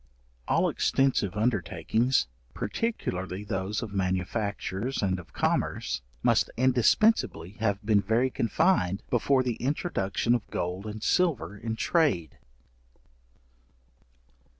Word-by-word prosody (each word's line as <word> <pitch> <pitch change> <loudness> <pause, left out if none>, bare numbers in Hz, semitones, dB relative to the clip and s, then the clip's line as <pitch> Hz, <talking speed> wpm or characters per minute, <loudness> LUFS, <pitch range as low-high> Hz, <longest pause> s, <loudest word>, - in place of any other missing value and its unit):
All - - +3
extensive 125 -8 +1
undertakings, 110 - +1 0.3
particularly 100 - -3
those 100 +2 -2
of 105 -3 -7
manufactures 100 +4 -2
and 95 -2 0
of 90 - -13
commerce, - - -1 0.2
must - - +3
indispensibly 130 - +3
have 100 -2 -1
been 105 -2 +4
very 120 +5 +1
confined, 115 - +1
before 130 +2 +3
the 120 -3 -2
introduction 120 - 0
of 120 -3 -2
gold 90 +4 -3
and 105 0 -6
silver 135 - +1
in 110 +2 -4
trade. 110 - +1
110 Hz, 105 wpm, -28 LUFS, 95-130 Hz, 0.3 s, been